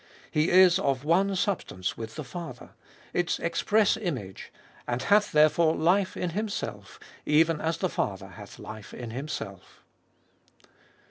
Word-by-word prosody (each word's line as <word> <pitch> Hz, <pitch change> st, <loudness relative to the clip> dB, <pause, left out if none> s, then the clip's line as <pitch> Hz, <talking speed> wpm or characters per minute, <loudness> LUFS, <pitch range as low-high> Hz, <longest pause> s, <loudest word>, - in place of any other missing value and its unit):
He 155 Hz, +2 st, +2 dB
is 185 Hz, -1 st, +6 dB
of 135 Hz, -1 st, 0 dB
one 190 Hz, +5 st, +2 dB
substance 180 Hz, -, -2 dB
with 110 Hz, -1 st, -7 dB
the 155 Hz, -, -5 dB
Father 170 Hz, +6 st, -8 dB, 0.2 s
— -, -, -26 dB
its 175 Hz, -, -1 dB
express 205 Hz, +5 st, +2 dB
image— 130 Hz, -, -5 dB, 0.4 s
and 120 Hz, +1 st, -2 dB
hath 205 Hz, +4 st, +3 dB
therefore 155 Hz, +1 st, +4 dB
life 185 Hz, +4 st, +2 dB
in 180 Hz, -, -2 dB
Himself, 210 Hz, +3 st, -4 dB, 0.2 s
even 160 Hz, +1 st, +3 dB
as 160 Hz, 0 st, -1 dB
the -, -, 0 dB
Father -, -, -3 dB
hath -, -, -12 dB
life 110 Hz, -1 st, -9 dB
in 120 Hz, -2 st, -7 dB
Himself. 115 Hz, -8 st, -7 dB
160 Hz, 140 wpm, -27 LUFS, 130-185 Hz, 0.4 s, is